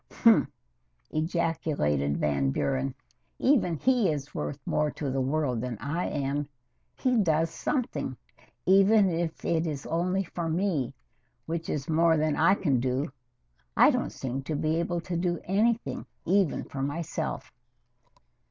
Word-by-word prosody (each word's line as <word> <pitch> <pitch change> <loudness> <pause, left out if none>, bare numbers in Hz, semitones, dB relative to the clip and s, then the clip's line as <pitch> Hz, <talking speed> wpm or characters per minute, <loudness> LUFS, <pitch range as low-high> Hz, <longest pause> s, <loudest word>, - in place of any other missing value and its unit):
"Humph!" - - +5 0.6
ejaculated 155 - 0
Van 70 -2 +1
Buren. 135 - -1 0.4
"Even 220 - +2
he 245 - +3
is 145 -2 -3
worth 145 - -3
more 150 0 +1
to 145 -2 -4
the 135 0 0
world 130 -3 0
than 125 -2 -4
I 150 - -2
am. 145 0 -2 0.5
He 255 -2 +1
does 165 -4 +2
something, 255 - -2 0.5
even 195 +1 +5
if 165 -1 -3
it 165 0 +1
is 145 -3 -4
only 180 +4 0
for 170 -2 -4
me, 160 -7 0 0.5
which 165 0 -4
is 140 -2 -2
more 165 0 +4
than 155 -1 +1
I 170 +5 +4
can 140 -10 +1
do. 130 +3 -1 0.7
I - - +7
don't - - -1
seem 130 +1 -4
to 155 - -2
be 155 +2 0
able 170 0 -1
to 175 +1 -4
do 175 0 0
anything 225 +5 0 0.2
even 190 -2 +2
for 135 - -6
myself." 145 +4 -3
160 Hz, 145 wpm, -28 LUFS, 140-175 Hz, 0.7 s, I